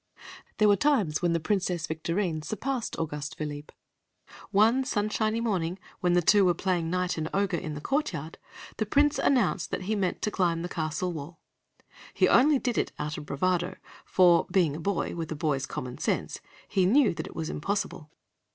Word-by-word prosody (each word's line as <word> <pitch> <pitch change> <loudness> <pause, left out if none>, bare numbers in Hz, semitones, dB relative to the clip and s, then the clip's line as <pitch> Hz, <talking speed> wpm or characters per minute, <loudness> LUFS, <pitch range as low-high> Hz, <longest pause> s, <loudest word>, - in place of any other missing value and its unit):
There 215 - +4
were 205 - +6
times 200 - +1
when 175 -1 +2
the 170 - +1
Princess 180 -1 -1
Victorine 165 +1 -2
surpassed 235 - -3
Auguste 150 -1 -4
Philippe. 145 -1 -6 0.8
One 225 +6 +4
sunshiny 215 -1 0
morning, 185 -6 -1 0.2
when 180 -1 +2
the 175 0 +3
two 205 +4 +5
were 180 -2 +3
playing 175 -2 -1
knight 180 -1 -1
and 155 0 -2
ogre 200 -2 +1
in 155 -1 -5
the 145 - -6
courtyard, 165 - -2 0.4
the 215 - -1
Prince 290 +5 +3
announced 240 -10 +2
that - - -3
he 215 +4 -1
meant 190 -3 -1
to 210 - 0
climb 170 -4 0
the 175 - -4
castle 160 +2 -2
wall. 155 +2 -8 0.8
He - - +4
did 260 -3 +3
it - - -1
only - - -3
out 150 0 -4
of 150 - -10
bravado, 175 +4 0 0.3
for, 175 -2 +4
being 175 -6 +2
a - - -6
boy, 190 +1 -1
with 165 -2 -5
a - - -2
boy's 145 -2 -1
common 125 -1 -6
sense, - - -1 0.3
he 190 -3 +2
knew 250 +1 +4
that - - -5
it - - -12
was 160 -1 -3
impossible. 195 -3 -3
180 Hz, 185 wpm, -28 LUFS, 160-210 Hz, 0.8 s, were